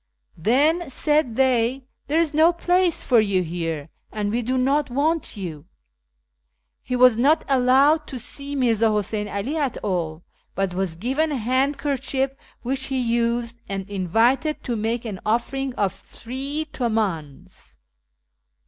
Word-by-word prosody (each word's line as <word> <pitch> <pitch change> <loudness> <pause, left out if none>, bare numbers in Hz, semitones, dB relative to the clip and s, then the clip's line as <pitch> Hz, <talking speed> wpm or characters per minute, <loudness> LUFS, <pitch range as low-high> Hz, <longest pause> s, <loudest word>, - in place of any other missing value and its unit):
' - - -52
Then,' 290 - +2
said 295 -3 +1
they, 255 0 +2
' - - -48
there 305 +3 +2
is 330 -3 +1
no 320 +3 +5
place 355 0 +1
for 245 -3 +4
you 200 -4 +2
here, 165 -3 -4 0.2
and 210 -1 -2
we 235 +2 0
do 255 +3 -1
not 275 +3 +1
want 300 +1 0
you.' 165 -6 -6 1.2
He 250 - -3
was 250 -2 +6
not 285 +7 +3
allowed 275 +4 +4
to 260 - -6
see 280 +4 -5
Mirza 230 -4 +2
Huseyn 210 0 -1
'Ali 225 +11 -3
at 280 -5 -1
all, 170 -4 -2 0.3
but 195 -2 -1
was 185 -2 -2
given 265 - 0
a 285 - -1
handkerchief 270 +2 0 0.3
which 265 +2 -1
he 265 -1 -1
had 235 -2 0
used, 235 0 -1
and 195 -1 -4
invited 230 - +1
to 245 - -2
make 225 +2 -2
an 205 -4 -5
offering 260 +5 -1
of 200 -2 0
three 275 +6 -6
tilmdns. 185 - -3
245 Hz, 150 wpm, -23 LUFS, 205-275 Hz, 1.2 s, was